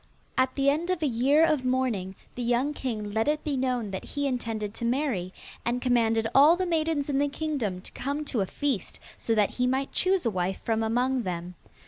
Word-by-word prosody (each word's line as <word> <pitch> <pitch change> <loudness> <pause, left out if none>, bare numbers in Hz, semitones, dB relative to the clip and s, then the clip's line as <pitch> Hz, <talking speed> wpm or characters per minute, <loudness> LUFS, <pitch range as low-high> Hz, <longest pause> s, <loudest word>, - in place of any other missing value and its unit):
At 260 0 +1
the 275 -1 +1
end 325 +5 -2
of 365 -3 0
a - - +3
year 275 +6 +4
of 300 -5 +1
mourning, 250 -7 0 0.2
the 250 - -5
young 245 +5 +1
king 220 -7 -4
let 220 +3 +1
it 300 0 +1
be 295 -3 -1
known 250 -5 -1
that 190 - -4
he 285 -1 -3
intended 225 -5 -2
to - - -7
marry, 235 -7 0 0.3
and 240 +1 0
commanded 230 -3 +2
all 300 +5 +7
the 370 - 0
maidens 320 -4 0
in 280 -2 +1
the 290 0 +2
kingdom 280 -12 -2
to - - -9
come 285 +3 -3
to 240 -7 -1
a 190 - -1
feast, 270 -7 -2 0.2
so 225 - 0
that 210 -2 +3
he 250 0 0
might 265 +2 0
choose 375 -3 +1
a 230 - +2
wife 185 0 -1
from 225 -1 0
among 250 +3 +1
them. 180 -3 -4
255 Hz, 215 wpm, -27 LUFS, 225-285 Hz, 0.3 s, all